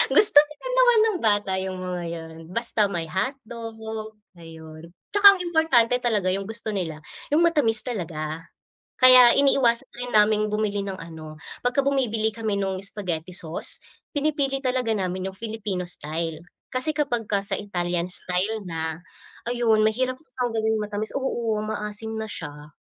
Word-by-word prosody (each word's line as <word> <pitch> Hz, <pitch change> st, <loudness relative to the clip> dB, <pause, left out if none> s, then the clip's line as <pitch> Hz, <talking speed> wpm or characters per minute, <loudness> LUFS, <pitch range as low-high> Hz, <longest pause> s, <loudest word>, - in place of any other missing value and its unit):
Gusto 420 Hz, -8 st, +5 dB
pa 300 Hz, 0 st, +2 dB
din -, -, -3 dB
naman -, -, +5 dB
ng 435 Hz, -5 st, +1 dB
bata 205 Hz, -3 st, +2 dB
yung 190 Hz, -1 st, -4 dB
mga 180 Hz, -1 st, -4 dB
yun, 160 Hz, -1 st, -7 dB
basta 220 Hz, -1 st, 0 dB
may 170 Hz, -4 st, -3 dB
hotdog, 225 Hz, -, -4 dB, 0.6 s
ayun. 160 Hz, 0 st, -11 dB, 0.2 s
Tsaka 400 Hz, -1 st, +9 dB
ang -, -, -14 dB
importante 320 Hz, -9 st, +3 dB
talaga 205 Hz, -6 st, +1 dB
yung 195 Hz, +2 st, -4 dB
gusto 225 Hz, -1 st, -3 dB
nila, 160 Hz, -6 st, -3 dB, 0.3 s
yung 330 Hz, +3 st, +4 dB
matamis 245 Hz, -10 st, +2 dB
talaga. 165 Hz, -8 st, -4 dB, 0.6 s
Kaya 255 Hz, -1 st, +9 dB
iniiwasan 270 Hz, -2 st, +3 dB
rin 245 Hz, 0 st, -6 dB
naming 215 Hz, 0 st, +4 dB
bumili 210 Hz, -1 st, -1 dB
ng 195 Hz, -1 st, -5 dB
ano 160 Hz, -2 st, -10 dB, 0.2 s
pagka 260 Hz, +3 st, +1 dB
bumibili 225 Hz, -6 st, +1 dB
kami 220 Hz, -3 st, -2 dB
nung 190 Hz, -1 st, -1 dB
spaghetti 185 Hz, -5 st, -4 dB
sauce, 170 Hz, -2 st, -3 dB, 0.3 s
pinipili 285 Hz, -2 st, 0 dB
talaga 255 Hz, -3 st, 0 dB
namin 185 Hz, -2 st, -2 dB
yung 190 Hz, -, -17 dB
Filipino 210 Hz, -5 st, -3 dB
style. 160 Hz, -1 st, -3 dB, 0.3 s
Kasi 255 Hz, +4 st, 0 dB
kapagka 240 Hz, -9 st, 0 dB
sa 200 Hz, 0 st, -3 dB
Italian 175 Hz, -3 st, -2 dB
style 185 Hz, +5 st, -2 dB
na, 160 Hz, -2 st, -3 dB, 0.5 s
ayun, 235 Hz, -3 st, +2 dB
mahirap 255 Hz, +4 st, 0 dB
siyang 250 Hz, -5 st, -4 dB
gawing 220 Hz, 0 st, +1 dB
matamis, 210 Hz, +1 st, -3 dB
oo. 235 Hz, -5 st, -1 dB
Maasim 215 Hz, +1 st, -5 dB
na 220 Hz, -, -4 dB
siya. 150 Hz, -5 st, -8 dB
215 Hz, 150 wpm, -24 LUFS, 180-245 Hz, 0.6 s, Tsaka